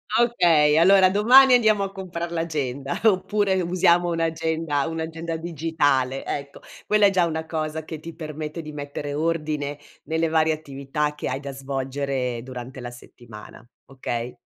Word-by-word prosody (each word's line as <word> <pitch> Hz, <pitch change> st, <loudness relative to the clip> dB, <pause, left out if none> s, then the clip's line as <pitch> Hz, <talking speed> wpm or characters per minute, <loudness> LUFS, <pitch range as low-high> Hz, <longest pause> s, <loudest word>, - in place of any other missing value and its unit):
Ah 240 Hz, -, +5 dB
okay 165 Hz, -10 st, +4 dB
allora 185 Hz, +2 st, +6 dB
domani 250 Hz, +7 st, +6 dB
andiamo 215 Hz, -4 st, +4 dB
a 195 Hz, -, -4 dB
comprar 175 Hz, -3 st, -6 dB
l'agenda 145 Hz, -5 st, -3 dB
oppure 205 Hz, -1 st, +2 dB
usiamo 175 Hz, 0 st, +3 dB
un'agenda 160 Hz, -2 st, -1 dB
un'agenda 165 Hz, 0 st, -4 dB
digitale, 150 Hz, -5 st, 0 dB
ecco. 140 Hz, -1 st, -5 dB, 0.2 s
Quella 210 Hz, -1 st, +4 dB
è -, -, +4 dB
già 185 Hz, -3 st, +2 dB
una 160 Hz, -1 st, -3 dB
cosa 160 Hz, -1 st, -3 dB
che 155 Hz, 0 st, -7 dB
ti 165 Hz, +1 st, -10 dB
permette 155 Hz, 0 st, -6 dB
di 155 Hz, -1 st, -9 dB
mettere 145 Hz, 0 st, -6 dB
ordine 150 Hz, -2 st, -2 dB, 0.3 s
nelle 160 Hz, 0 st, -1 dB
varie 160 Hz, 0 st, +2 dB
attività 150 Hz, 0 st, -3 dB
che 150 Hz, -, -5 dB
hai 130 Hz, +2 st, -3 dB
da 140 Hz, -1 st, -6 dB
svolgere 135 Hz, -2 st, -3 dB
durante 130 Hz, +1 st, -8 dB
la 120 Hz, -, -6 dB
settimana, 120 Hz, -2 st, -13 dB, 0.2 s
okay? 120 Hz, -2 st, -4 dB
160 Hz, 150 wpm, -23 LUFS, 140-170 Hz, 0.3 s, allora